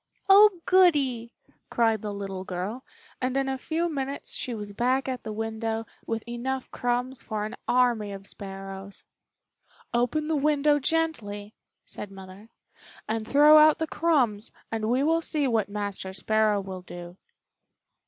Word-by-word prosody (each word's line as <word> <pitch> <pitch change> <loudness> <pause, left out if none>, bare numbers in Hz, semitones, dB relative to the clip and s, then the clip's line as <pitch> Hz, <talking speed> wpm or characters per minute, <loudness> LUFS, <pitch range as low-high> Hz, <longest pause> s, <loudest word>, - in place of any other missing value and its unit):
"Oh, 395 -2 +7
goody!" 280 -11 +3 0.4
cried 225 -3 +2
the 210 - -4
little 195 -2 -5
girl, 190 +7 -4 0.4
and 255 +1 0
in 270 0 +1
a 265 - -1
few 320 +6 -1
minutes 280 -3 -4
she 245 -3 -3
was 205 -1 -7
back 255 +5 +1
at 255 -1 -3
the 220 - -6
window 225 +1 -3 0.2
with 225 +1 -3
enough 255 +2 -4
crumbs 245 +1 -1
for 215 -1 -3
an 215 - -6
army 240 -4 +2
of 195 0 -8
sparrows. 195 0 -8 0.9
"Open 245 +6 +1
the 320 - +1
window 295 0 +3
gently," 235 -10 -2 0.3
said 205 - -7
Mother, 195 +2 -12 0.6
"and 220 0 -2
throw 295 +4 +7
out 310 0 +6
the 320 - -1
crumbs, 260 -11 +1 0.2
and 220 -1 -1
we 255 +3 +2
will 325 +2 +2
see 300 -4 0
what 220 -5 +1
Master 200 -2 -4
Sparrow 215 +1 +1
will 190 -1 -7
do." 175 0 -10
235 Hz, 150 wpm, -27 LUFS, 205-280 Hz, 0.9 s, Oh